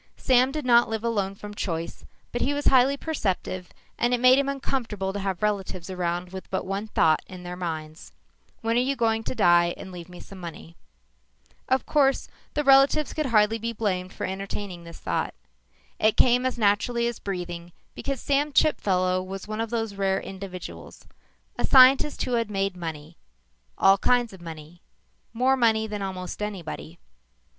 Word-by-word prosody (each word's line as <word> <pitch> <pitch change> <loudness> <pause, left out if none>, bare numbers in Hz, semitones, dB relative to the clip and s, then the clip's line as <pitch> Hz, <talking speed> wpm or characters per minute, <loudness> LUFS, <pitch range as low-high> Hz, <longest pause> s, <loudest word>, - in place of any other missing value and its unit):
Sam 255 0 +3
did 305 -1 -4
not 240 -1 +5
live 220 0 -3
alone 200 -4 -1
from 210 +1 -9
choice, 170 -4 -4 0.3
but 240 - -3
he 285 +2 +1
was 290 - -3
highly 265 +2 +5
perceptive 190 - -3 0.3
and 245 +1 +3
it - - -4
made 255 +2 +6
him 280 0 0
uncomfortable 230 -8 -3
to 205 - -3
have 190 -1 -3
relatives 190 -4 -2
around 175 0 -2
with 190 0 -8
but 190 - -2
one 195 +3 -3
thought 160 -6 +3
in 185 -1 -10
their 175 0 -6
minds: 160 -3 -6 0.5
When 230 +1 +1
are - - +5
you 265 +3 +1
going 225 -2 +1
to - - -3
die 175 -3 +4
and 190 - -9
leave 175 -1 -9
me 180 0 -11
some 195 +1 -12
money? 170 -1 -9 0.9
Of 260 0 +2
course, 275 -3 +2 0.3
the 295 - +1
relatives 275 +2 +5
could 310 -2 -1
hardly 220 -1 +3
be 230 +1 -3
blamed 185 -4 -2
for - - -5
entertaining 190 -2 -5
this 170 - -10
thought. - - -2 0.6
It 215 0 +3
came 250 +1 +4
as 255 - -3
naturally 235 +3 +2
as 235 -1 -2
breathing 175 -3 -5 0.2
because 275 -2 -4
Sam 285 +2 0
Chipfellow 185 -12 +2
was 195 +1 -7
one 215 +1 -3
of 225 - -3
those 225 -2 -2
rare 195 -1 0
individuals 190 -2 -9 0.5
a - - -1
scientist 265 +2 +6
who - - -3
had 230 -2 0
made 195 -2 -1
money; 160 - -7 0.6
all 195 0 +5
kinds 245 -1 +2
of 190 - -12
money; 165 +1 -10 0.5
more 255 +3 +2
money 225 -3 +3
than 210 -1 -5
almost 185 0 -5
anybody. 175 -5 -6
205 Hz, 175 wpm, -25 LUFS, 185-245 Hz, 0.9 s, made